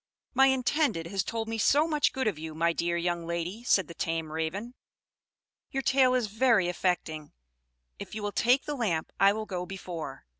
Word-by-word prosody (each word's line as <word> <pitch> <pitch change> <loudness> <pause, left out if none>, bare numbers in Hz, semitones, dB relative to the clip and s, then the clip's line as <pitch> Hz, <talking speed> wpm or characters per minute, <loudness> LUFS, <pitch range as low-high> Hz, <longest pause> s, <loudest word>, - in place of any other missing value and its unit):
"My 270 +1 +6
intended 265 - +1
has 190 +2 -1
told 225 +2 -3
me 225 0 -3
so 295 +8 +4
much 300 -3 +2
good 265 0 -2
of 200 -8 -1
you, 160 0 -7
my 170 +1 +2
dear 170 +1 -1
young 170 -1 -2
lady," 170 +6 -3
said 190 -8 +3
the 170 - -9
tame 165 -2 -3
Raven. 170 +10 -3 1.0
"Your 270 0 -3
tale 255 -1 +4
is 250 -3 +1
very 220 -2 +3
affecting. 175 -4 -2 0.7
If - - -8
you 215 - -5
will 205 - -1
take 250 +6 +3
the 295 - -3
lamp, 200 - -1
I 195 0 +6
will 215 +1 -3
go 180 -4 -4
before. 170 -8 -7
195 Hz, 190 wpm, -28 LUFS, 170-245 Hz, 1.0 s, My